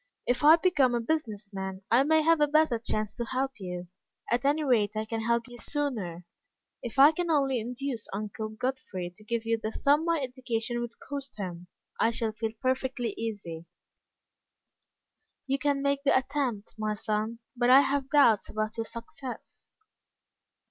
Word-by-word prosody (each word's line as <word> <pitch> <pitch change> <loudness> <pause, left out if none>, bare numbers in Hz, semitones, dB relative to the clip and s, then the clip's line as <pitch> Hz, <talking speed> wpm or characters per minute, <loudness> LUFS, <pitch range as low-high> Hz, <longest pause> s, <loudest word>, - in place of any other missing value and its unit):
If 245 +3 0
I 310 +2 +9
become 300 -8 +3
a - - +1
business 225 -7 -2
man, 190 0 -5
I 240 +3 +6
may 315 +2 +3
have 325 -1 +4
a 295 - +5
better 305 -5 +3
chance 215 -2 -2
to 235 - -1
help 260 +1 -2
you. 180 -2 -5 0.4
At 240 +2 +1
any 295 +2 +2
rate, 220 -7 +2
I 215 - -1
can 225 0 -3
help 235 +2 +1
you 240 -1 -11
sooner. 215 - -3 0.6
If 240 +2 -7
I 280 +3 +9
can 345 +2 -2
only 275 -5 +2
induce 245 0 -4
Uncle 215 +2 -4
Godfrey 215 -7 -4
to 215 - -17
give 230 +1 -2
you 230 0 +1
the 220 - -2
sum 290 +6 +3
my 335 -1 +1
education 245 -3 -2
would 235 -1 -6
cost 280 -2 -6
him, 180 -3 -6 0.3
I 225 - +4
shall 230 -1 -1
feel 220 0 -3
perfectly 255 -2 0
easy." 180 -7 -5 1.8
"You 275 0 0
can 280 0 +1
make 280 0 +1
the 280 - +4
attempt, 260 -5 -2
my 215 0 -1
son, 215 +2 -2 0.2
but 240 0 +2
I 265 +2 +9
have 275 0 0
doubts 255 -9 +4
about 215 +1 -3
your 225 - -1
success." 235 +3 -8
240 Hz, 170 wpm, -29 LUFS, 215-275 Hz, 1.8 s, I